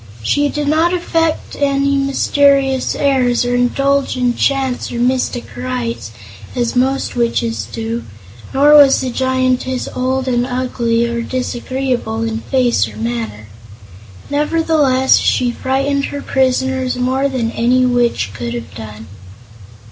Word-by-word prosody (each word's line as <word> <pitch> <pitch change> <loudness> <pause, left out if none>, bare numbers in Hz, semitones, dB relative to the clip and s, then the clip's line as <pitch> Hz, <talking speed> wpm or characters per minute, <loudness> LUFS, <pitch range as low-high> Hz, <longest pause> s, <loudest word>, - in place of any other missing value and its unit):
She 290 - +1
did 295 0 -3
not 325 +4 +2
affect 330 -2 -1
any 280 0 +1
mysterious 275 -1 +2
airs 255 -4 +1
or 245 - 0
indulge 275 +3 +1
in 245 -1 +1
chants 270 -2 0
or - - -6
mystic 250 0 -1
rites, 120 -3 -4 0.5
as 240 -1 -1
most 265 +2 0
witches 235 -1 -1
do, 230 +1 -4 0.5
nor 290 +2 +4
was 285 -2 +7
the 255 - -3
Giantess 260 0 0
old 260 +1 -1
and 245 -1 +1
ugly 245 -2 -1
or 235 0 -2
disagreeable 250 -2 -3
in 225 0 -2
face 245 - +1
or 110 -1 -11
manner. 110 -2 -4 0.9
Nevertheless, 295 -3 +2
she 245 -1 +1
frightened 275 +3 -1
her 285 0 -6
prisoners 260 -1 0
more 260 +2 0
than 240 -4 -2
any 250 +2 +2
witch 240 - +1
could 120 +2 -5
have 115 -4 -7
done. 110 0 -9
255 Hz, 130 wpm, -16 LUFS, 235-275 Hz, 0.9 s, was